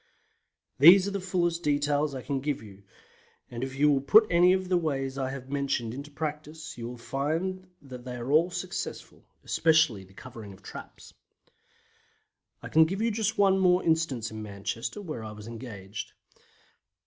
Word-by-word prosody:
These 185 +7 +8
are - - -2
the 200 - -2
fullest 175 -2 0
details 145 -1 +1
I 130 - -6
can 140 -1 -2
give 140 -3 -3
you, 100 -2 -13 0.7
and 120 +1 -5
if 130 0 -5
you 150 +1 +5
will 135 -1 +2
put 215 +11 +6
any 175 +1 +6
of 185 0 -1
the 180 - +2
ways 135 -5 -2
I 135 -1 -2
have 135 0 -8
mentioned 140 -5 -1
into 140 +3 -7
practice 150 +1 -6
you 115 -1 -6
will 125 +1 -7
find 165 +10 -2 0.2
that 125 -3 -10
they 125 0 -6
are 120 +2 -4
all 160 +4 +4
successful, 180 +1 -6 0.2
especially 155 -11 +3
the 95 0 -19
covering 115 -5 -10
of 95 - -18
traps. - - -11 1.5
I - - -5
can 160 0 +6
give 195 +6 -2
you 230 - +2
just 220 0 -1
one 195 -1 +4
more 180 -1 +4
instance 160 -9 0
in 110 0 -7
Manchester, 110 - -5
where 155 - -6
I 110 -1 -7
was 105 0 -11
engaged. 110 -4 -7
145 Hz, 175 wpm, -28 LUFS, 120-175 Hz, 1.5 s, These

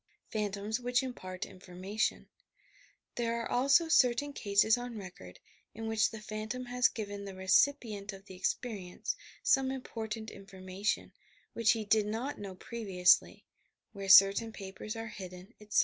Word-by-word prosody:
PHANTOMS 210 +1 -2
WHICH 250 +1 +1
IMPAKT 185 -8 -5
INFORMATION 185 +2 -3 0.9
There 235 -1 0
are 230 - -3
also 275 +7 +4
certain 285 -1 +3
cases 205 -1 +3
on 245 -1 -6
record 175 - -10 0.4
in 225 +1 -6
which 220 0 +2
the 220 - -8
phantom 215 +4 -5
has 245 0 +3
given 205 -2 -6
the 195 -1 -7
recipient 205 +1 +2
of 195 0 -12
the 190 - -11
experience 185 0 -3 0.3
some 265 -1 +3
important 225 -4 -5
information, 195 +1 -4 0.4
which 230 0 +4
he 220 -2 -4
did 210 0 +3
not 235 +7 -3
know 195 -2 -7
previously 185 -4 +2 0.2
— - - -56
where 195 -2 -6
certain 195 +4 +7
papers 200 +1 -7
are 225 0 -5
hidden, 185 +1 -9
etc. 210 0 +1
215 Hz, 145 wpm, -32 LUFS, 195-235 Hz, 0.9 s, certain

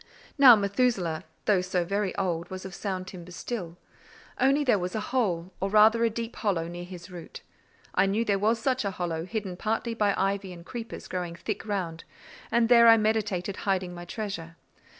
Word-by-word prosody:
Now 265 -5 +9
Methusaleh, 200 -5 0 0.2
though 200 -3 +3
so 180 -1 -1
very 200 +1 -1
old, 175 -3 -2
was 185 0 -7
of 190 - -7
sound 190 -2 -4
timber 180 -2 -10
still; 175 -3 -5 0.6
only 275 +3 +3
there 245 -7 +3
was 180 +2 -3
a - - 0
hole, 185 -8 0
or 195 - -1
rather 215 +3 +5
a 230 - +4
deep 230 +1 -5
hollow, 180 -6 0
near 175 +1 -7
his 180 0 -10
root. 175 -2 -10 0.5
I - - +3
knew 215 +4 +1
there 200 -2 +1
was 220 +3 +2
such 255 +2 0
a 200 - 0
hollow, 170 -3 -3
hidden 195 -3 -4
partly 225 +3 -1
by 210 -3 +1
ivy 195 -1 -1
and 170 -1 -12
creepers 230 0 -7
growing 180 -2 -4
thick 170 +5 -5
round; 175 -6 -3 0.5
and 235 0 +3
there 235 -1 +7
I 225 0 +9
meditated 210 -3 0
hiding 185 -2 -1
my 175 0 -8
treasure. 175 -4 -5
195 Hz, 190 wpm, -27 LUFS, 180-220 Hz, 0.6 s, Now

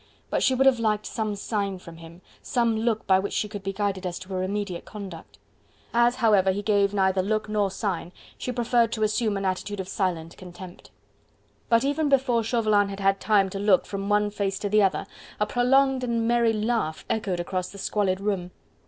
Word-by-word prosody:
But - - +1
she 260 - +3
would 265 +1 +2
have 265 -3 +5
liked 215 -2 0
some 215 -2 -2
sign 200 -1 -2
from 170 -2 -12
him, 165 +2 -13 0.2
some 235 -3 +1
look 220 0 0
by 190 -1 +4
which 200 +1 -3
she 210 - 0
could 205 -1 -7
be 195 0 -3
guided 195 -1 -2
as 180 -1 -3
to 185 - -11
her 185 -1 -2
immediate 195 -2 -3
conduct: 195 -6 -9 0.6
as, 240 +1 +4
however, 210 -6 +4
he 200 +2 -3
gave 200 -1 +2
neither 190 -2 +2
look 215 +3 -1
nor 210 -2 +1
sign, 185 -3 -3 0.2
she 250 - -4
preferred 240 -1 +2
to 220 - -1
assume 215 -1 +1
an 195 - -3
attitude 195 +2 -2
of 190 - -4
silent 175 -4 -2
contempt. 180 0 -11 0.8
But 230 +1 +4
even 290 +2 +1
before 255 -4 +2
Chauvelin 215 -3 +2
had 195 0 -6
had 195 0 +2
time 200 -2 +3
to 195 - -4
look 200 -2 +3
from 200 0 -4
one 210 0 +2
face 195 -1 -2
to 205 0 -3
the 210 +1 +4
other, 195 0 +1 0.3
a 210 - +2
prolonged 260 +3 +2
and 230 -2 0
merry 235 -1 +3
laugh 215 -7 -1
echoed 195 -5 -1
across 180 +1 -3
the 200 - -11
squalid 195 -1 0
room. 195 -3 -2
205 Hz, 205 wpm, -25 LUFS, 190-225 Hz, 0.8 s, have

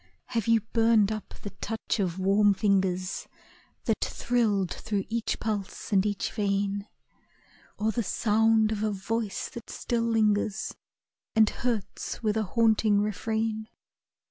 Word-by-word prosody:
Have 230 -2 -1
you 230 -1 +4
burned 225 -3 +4
up 215 -1 -6
the 205 - -5
touch 225 +1 -2
of 185 -3 0
warm 200 +2 +4
fingers 190 -2 0 0.6
That - - 0
thrilled 210 -7 0
through 205 -3 -2
each 230 0 -1
pulse 210 -1 -4
and 190 -1 +5
each 205 -1 -2
vein, 200 0 -1 0.9
Or 215 +1 +1
the 235 - -1
sound 220 +1 +3
of 210 -1 -2
a 215 - +1
voice 210 +1 -2
that 235 - -10
still 235 -1 -1
lingers 215 -3 +1 0.6
And 220 -1 +5
hurts 235 -2 -3
with 215 -1 +1
a 220 - +2 0.2
haunting 220 -2 +4
refrain? 220 +1 -1
215 Hz, 135 wpm, -28 LUFS, 200-225 Hz, 0.9 s, and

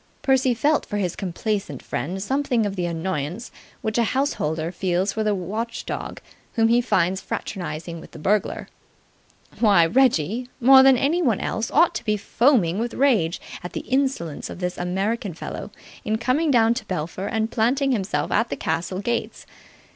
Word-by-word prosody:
Percy 265 -2 +3
felt 295 +5 +2
for 205 - -3
his 185 -4 -1
complaisant 195 - -3
friend 190 +5 -3
something 255 -2 0
of 200 -1 -3
the 180 -2 -1
annoyance 170 - -3 0.3
which 220 +1 0
a - - +4
householder 165 - -1
feels 185 +2 0
for 220 - -1
the 210 -1 +1
watchdog 215 +6 -4 0.3
whom 225 -1 +3
he 240 +1 +4
finds 190 -5 +1
fraternizing 170 -3 -5
with - - -12
the - - -12
burglar. 200 +6 0 0.9
Why, 200 -7 +5
Reggie, 235 - +2
more 265 +2 +8
than 265 -1 +6
anyone 275 - +1
else, 220 - -2
ought 330 +3 +4
to - - -4
be 215 -2 0
foaming 210 - +2
with 235 +1 -3
rage 220 -12 +2 0.2
at 180 - -7
the - - -3
insolence 260 - -1
of - - -7
this 180 0 -3
American 195 +2 -2
fellow - - -6 0.3
in 220 +1 0
coming 255 +8 +1
down 230 -4 +4
to 235 -2 -5
Belpher 185 +1 -4
and 220 +1 -1
planting 265 +5 +1
himself 205 -5 -1
at 230 +1 +2
the - - -3
castle 170 +4 -2
gates. 235 +3 -3
215 Hz, 165 wpm, -23 LUFS, 180-245 Hz, 0.9 s, more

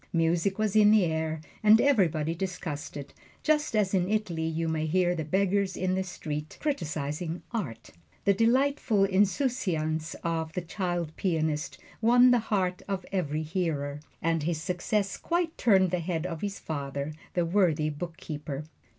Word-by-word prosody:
Music 170 +3 +1
was 215 -1 0
in 210 -1 +7
the 210 -3 +5
air, 160 -1 -1 0.2
and 215 +1 +7
everybody 170 - +2
discussed 170 -5 -5
it, 140 - -8 0.3
just 300 -5 +2
as 205 -3 +2
in 185 -1 +2
Italy 185 -7 -1
you 165 +1 -1
may 160 -1 -1
hear 175 +2 +2
the 160 -2 -3
beggars 190 +3 +1
in 185 0 0
the 190 - +1
streets 155 -4 -5
criticizing 160 - -3
art. 130 - -4 0.3
The 200 - +5
delightful 235 -1 +2
insouciance 190 - +1
of 160 -1 -2
this 180 -2 -3
child 175 -3 -2
pianist 155 -5 -1 0.2
won 245 +2 +6
the 245 - +5
heart 185 -5 -1
of 195 -2 -3
every 155 -5 -1
hearer, 155 -4 -2 0.2
and 165 -1 +1
his 160 +1 -1
success 180 +3 -1
quite 340 -1 -1
turned 190 -5 +4
the 180 - +1
head 165 -1 -2
of 165 -3 -4
his 200 -1 -3
father, 140 -1 -4 0.2
the 175 -1 +2
worthy 165 -4 +2
bookkeeper. 150 -2 -6
175 Hz, 155 wpm, -28 LUFS, 160-200 Hz, 0.3 s, in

